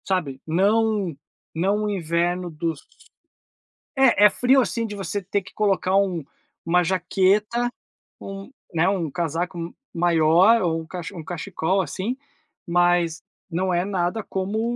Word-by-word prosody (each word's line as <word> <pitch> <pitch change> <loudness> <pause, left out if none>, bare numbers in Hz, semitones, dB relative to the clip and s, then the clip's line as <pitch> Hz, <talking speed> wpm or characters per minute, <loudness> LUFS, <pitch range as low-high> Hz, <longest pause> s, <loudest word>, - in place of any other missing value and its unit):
Sabe, 150 -9 -1
não 200 +1 +2 0.4
não 195 +6 +1
o 210 - -1
inverno 175 -1 -1
dos 160 -1 -3 1.2
É, 255 -6 +5
é - - +9
frio 255 +6 +3
assim 230 -1 -1
de 210 -2 -6
você 200 +1 -3
ter 195 +2 -1
que 190 - -15
colocar 195 -2 +1
um 185 -5 +1 0.4
uma 180 +2 +3
jaqueta, 195 +6 +1 0.5
um 195 +3 -8 0.2
né, 165 +1 +2
um 180 -5 -1
casaco 170 +3 -2
m 170 0 -6 0.2
maior 175 +6 +4
ou 165 -3 0
um - - -10
cache 175 -1 -6
um 165 - -7
cachecol, 180 +2 -1
assim, 200 +7 -3 0.5
mas 175 -1 +2 0.3
não 185 +2 -1
é 175 +1 +1
nada 190 +2 -1
como 215 +6 -2
185 Hz, 140 wpm, -23 LUFS, 170-205 Hz, 1.2 s, é